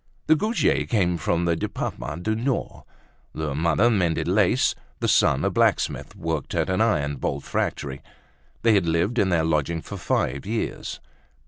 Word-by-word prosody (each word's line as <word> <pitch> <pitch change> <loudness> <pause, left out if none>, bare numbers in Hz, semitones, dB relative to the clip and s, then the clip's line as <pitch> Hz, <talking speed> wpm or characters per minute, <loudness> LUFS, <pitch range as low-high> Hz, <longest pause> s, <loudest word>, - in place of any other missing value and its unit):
The 155 - +5
Goujets 215 - +1
came 90 -6 +2
from 85 +2 0
the 85 -1 +2
Departement 85 +1 -4
du 110 - 0
Nord. 120 +4 -2 0.5
The 80 -2 -2
mother 85 +9 +2
mended 90 -7 +1
lace; - - +3 0.3
the - - 0
son, - - +3
a - - +1
blacksmith, - - +1
worked 80 -3 -3
at - - 0
an 95 - +1
iron 75 -11 +1
bolt - - -3
factory. 70 -1 -3 0.6
They 115 -1 +5
had 95 -5 +2
lived 85 +9 +1
in 95 - +3
their 85 -3 +2
lodging 80 +1 0
for 100 - -7
five 70 -5 -1
years. 110 +2 -3
85 Hz, 160 wpm, -24 LUFS, 80-110 Hz, 0.6 s, The